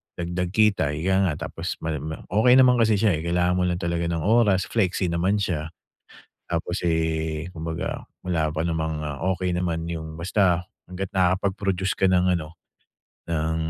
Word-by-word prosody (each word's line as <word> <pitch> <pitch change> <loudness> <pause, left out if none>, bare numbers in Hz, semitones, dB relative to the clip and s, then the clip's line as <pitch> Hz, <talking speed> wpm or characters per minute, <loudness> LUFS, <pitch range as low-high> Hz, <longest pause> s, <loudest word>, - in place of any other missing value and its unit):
dagdag 85 +1 -3
kita, 100 -9 +3
ika 95 +4 +2
nga 85 - 0 0.2
tapos 85 +3 -4
mal 80 -1 -1
ma 80 +3 -6
okey 110 +5 +5
naman 125 -1 +6
kasi 110 -2 +4
siya, 105 +1 +3
eh. - - -5
Kailangan 90 +1 +1
mo - - +2
lang 90 - 0
talaga 85 -1 -1
ng 85 -2 -2
oras, 105 -3 +3
flexi 95 -4 +1
naman 90 +4 +1
siya. 80 -6 -1 0.8
Tapos, 85 +2 -2
eh, 80 -1 -1
kumbaga 80 0 -4 0.2
wala 80 -4 0
pa 80 - -1
namang 80 -2 -2 0.3
okey 90 -1 -2
naman 85 -2 -1
yung 80 -2 -5
basta 90 0 +1 0.2
hangga't 90 +1 -5
nakapag-produce 95 +1 +1
ka - - +2
ng 90 -1 +3
ano, 80 -1 -8 0.7
ng 80 -1 -1
90 Hz, 160 wpm, -24 LUFS, 80-95 Hz, 0.8 s, naman